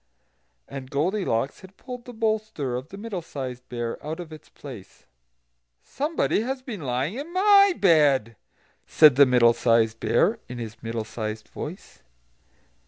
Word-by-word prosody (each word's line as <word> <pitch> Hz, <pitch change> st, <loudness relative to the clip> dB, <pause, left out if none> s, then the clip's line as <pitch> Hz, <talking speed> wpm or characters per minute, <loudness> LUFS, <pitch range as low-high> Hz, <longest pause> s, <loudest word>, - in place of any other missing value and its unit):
And 135 Hz, -2 st, -8 dB
Goldilocks 145 Hz, -, -1 dB
had 190 Hz, +1 st, -15 dB
pulled 250 Hz, -1 st, -9 dB
the 245 Hz, -, -9 dB
bolster 215 Hz, -, -2 dB
of 130 Hz, +3 st, -5 dB
the 195 Hz, -, -10 dB
Middle 205 Hz, -4 st, -5 dB
sized 130 Hz, -5 st, -7 dB
Bear 120 Hz, -1 st, -4 dB
out 160 Hz, +3 st, -5 dB
of 165 Hz, -3 st, -8 dB
its 155 Hz, -, -13 dB
place. 120 Hz, -10 st, -12 dB, 0.8 s
"SOMEBODY 295 Hz, -6 st, -1 dB
HAS 255 Hz, +2 st, -4 dB
BEEN 220 Hz, -9 st, -6 dB
LYING 135 Hz, -, -2 dB
IN 305 Hz, +4 st, -7 dB
MY 395 Hz, 0 st, +5 dB
BED!" 145 Hz, -, +4 dB, 0.5 s
said 150 Hz, -4 st, +6 dB
the 140 Hz, 0 st, +7 dB
Middle 120 Hz, -2 st, +5 dB
sized 115 Hz, -1 st, +2 dB
Bear, 195 Hz, -, +2 dB
in 125 Hz, -, -6 dB
his 115 Hz, -2 st, -7 dB
middle 115 Hz, -1 st, -3 dB
sized 110 Hz, 0 st, -6 dB
voice. -, -, -9 dB
145 Hz, 150 wpm, -25 LUFS, -, 0.8 s, the